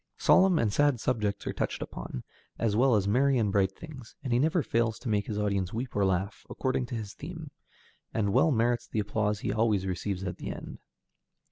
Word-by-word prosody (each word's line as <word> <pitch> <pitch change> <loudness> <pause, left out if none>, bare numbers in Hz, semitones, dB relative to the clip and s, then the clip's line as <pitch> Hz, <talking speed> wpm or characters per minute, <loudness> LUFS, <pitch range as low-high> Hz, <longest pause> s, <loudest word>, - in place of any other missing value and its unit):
Solemn 185 -2 +5
and 110 -7 +1
sad 145 -2 +3
subjects 105 -5 -1
are - - -2
touched - - -2
upon, - - -6 0.3
as 110 -3 0
well 125 +1 +4
as 100 -2 +1
merry 135 +5 +3
and 105 -4 +1
bright 95 -1 +2
things, 135 -1 -11
and 130 -4 -1
he 120 - +3
never 160 +3 +2
fails 115 -2 0
to 125 - -6
make 105 -2 +1
his 105 - -3
audience 100 -3 0
weep 120 +3 -4
or 100 - +2
laugh, 95 +2 -1
according 130 -1 -1
to 120 - -5
his 105 -3 -5
theme, 160 -1 -8 0.6
and 100 -3 0
well 135 +7 +5
merits 120 -2 +1
the - - -5
applause 105 0 0
he - - -1
always 110 -4 +2
receives 95 +1 -3
at 90 - -4
the - - -6
end. - - -7
110 Hz, 210 wpm, -29 LUFS, 100-130 Hz, 0.6 s, Solemn